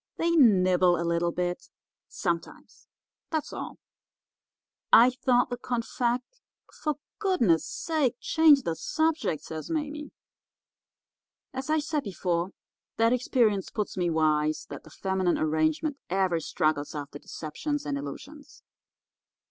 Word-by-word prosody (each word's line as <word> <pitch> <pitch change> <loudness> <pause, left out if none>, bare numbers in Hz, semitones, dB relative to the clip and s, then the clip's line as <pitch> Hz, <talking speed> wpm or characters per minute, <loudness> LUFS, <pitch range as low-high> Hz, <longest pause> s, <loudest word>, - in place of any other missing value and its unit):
They 335 +1 +1
nibble 185 - +5
a 170 - -1
little 170 0 +1
bit 175 0 -3 0.4
sometimes; 170 -3 -4 0.4
that's 315 -2 -3
all.' - - -6 1.1
"'I 245 +2 +8
thought 250 0 +1
the 245 - -2
confect—' 245 - -2 0.3
"'For 300 -1 -2 0.2
goodness' 300 - +2
sake, 300 -7 0
change 310 -4 +5
the - - -1
subject,' 320 - -1
says 160 -1 -7
Mame. 300 -1 -3 1.4
"As 265 +3 -5
I 310 - +3
said 300 0 -1
before, 180 -3 -1 0.5
that 230 +1 +4
experience 230 -6 +1
puts 210 - -3
me 180 -2 0
wise 155 -1 +1
that - - -7
the - - -14
feminine 190 -2 0
arrangement 155 - 0
ever 185 -2 +1
struggles 155 -1 -1
after 145 -1 -6
deceptions 290 - -4
and 145 - -2
illusions. 270 - -9
210 Hz, 120 wpm, -27 LUFS, -, 1.4 s, I